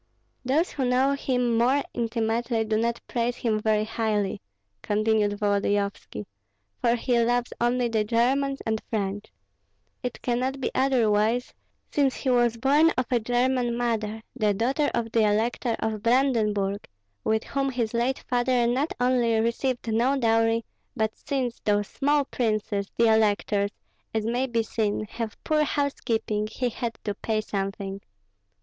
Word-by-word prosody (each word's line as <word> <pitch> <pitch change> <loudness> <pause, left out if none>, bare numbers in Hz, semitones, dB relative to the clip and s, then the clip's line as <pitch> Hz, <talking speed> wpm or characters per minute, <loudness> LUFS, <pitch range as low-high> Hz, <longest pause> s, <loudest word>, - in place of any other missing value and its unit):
"Those 290 +8 +1
who 275 - -2
know 255 +2 +3
him 250 -4 0
more 265 +4 +3
intimately 230 0 -1
do 215 0 0
not 235 +1 0
praise 240 0 -1
him 220 -3 0
very 215 0 +2
highly," 215 -2 -1 0.4
continued 210 0 +1
Volodyovski, 205 - -1 0.5
"for 235 0 +2
he 240 0 +1
loves 240 +1 +1
only 240 +1 +2
the 220 -2 +1
Germans 265 +5 +1
and 220 -1 -1
French. 205 -1 -2 0.8
It 250 -2 -4
cannot 255 +2 -1
be 260 - -2
otherwise, 235 -3 +2 0.4
since 275 -3 +2
he 260 - -1
was 240 -2 +3
born 285 +6 +4
of 255 - +1
a 245 - +3
German 245 +1 +1
mother, 220 -2 -2
the 210 -5 +1
daughter 270 +7 +1
of 230 -1 -2
the 230 - +2
elector 225 +2 +1
of 215 -2 -2
Brandenburg, 220 -5 +1 0.4
with 220 0 +1
whom 275 -1 -1
his 240 -4 -2
late 240 +3 -1
father 245 -1 +2
not 260 +6 0
only 245 -3 +2
received 235 +2 -1
no 250 +5 +2
dowry, 225 -1 +2 0.3
but, 220 0 0
since 260 -4 -3
those 205 -1 +1
small 285 0 +1
princes 215 -5 -1
(the 230 - +4
electors) 205 -1 +2 0.5
as 220 -1 0
may 245 +3 0
be 230 -2 0
seen 215 -1 -1
have 225 -2 -5
poor 305 -1 +2
housekeeping, 230 -7 -1
he 250 -1 -1
had 235 0 -4
to 205 - -2
pay 215 +2 -2
something. 195 -1 -4
235 Hz, 145 wpm, -26 LUFS, 215-250 Hz, 0.8 s, born